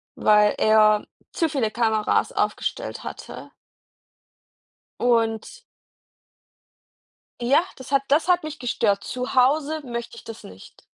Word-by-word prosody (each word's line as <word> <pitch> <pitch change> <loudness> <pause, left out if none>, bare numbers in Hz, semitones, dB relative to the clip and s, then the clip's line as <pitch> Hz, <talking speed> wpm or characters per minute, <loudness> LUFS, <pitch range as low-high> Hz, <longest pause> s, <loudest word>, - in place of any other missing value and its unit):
weil 210 -1 +4
er 215 -1 +4 0.3
zu 330 -3 0
viele 250 -8 -1
Kameras 220 -2 0
aufgestellt - - -3
hatte. - - -9 1.5
Und 230 - 0 1.8
ja, 270 +7 +4
das 260 0 -12
hat 275 -1 +2
das 310 +5 +2
hat 355 -1 +3
mich 310 0 -7
gestört. 215 -5 0
Zu 255 +1 -5
Hause 295 +4 +2
möchte 235 -1 -6
ich - - -12
das 225 0 -10
nicht. 95 +1 -14
240 Hz, 115 wpm, -23 LUFS, 220-285 Hz, 1.8 s, weil